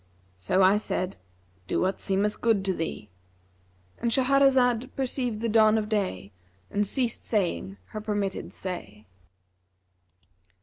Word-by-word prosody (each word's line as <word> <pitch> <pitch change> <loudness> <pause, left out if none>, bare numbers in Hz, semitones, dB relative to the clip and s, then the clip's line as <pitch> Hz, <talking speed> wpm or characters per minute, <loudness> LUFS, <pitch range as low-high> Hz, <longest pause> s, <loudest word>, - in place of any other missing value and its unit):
So 95 - +1
I 190 +2 +6
said, 185 -3 -3 0.5
'Do - - 0
what 190 +1 0
seemeth 200 +2 0
good 220 -5 +2
to 190 - +1
thee;'—And 90 - -8
Shahrazad 260 -1 +3
perceived 250 -4 -2
the 230 - 0
dawn 220 0 +5
of 210 -1 -2
day 185 - -2 0.4
and 205 0 +1
ceased 245 0 -1
saying 170 - -1
her 215 - -6
permitted 205 -2 -2
say. 110 - -7
200 Hz, 120 wpm, -27 LUFS, -, 0.5 s, I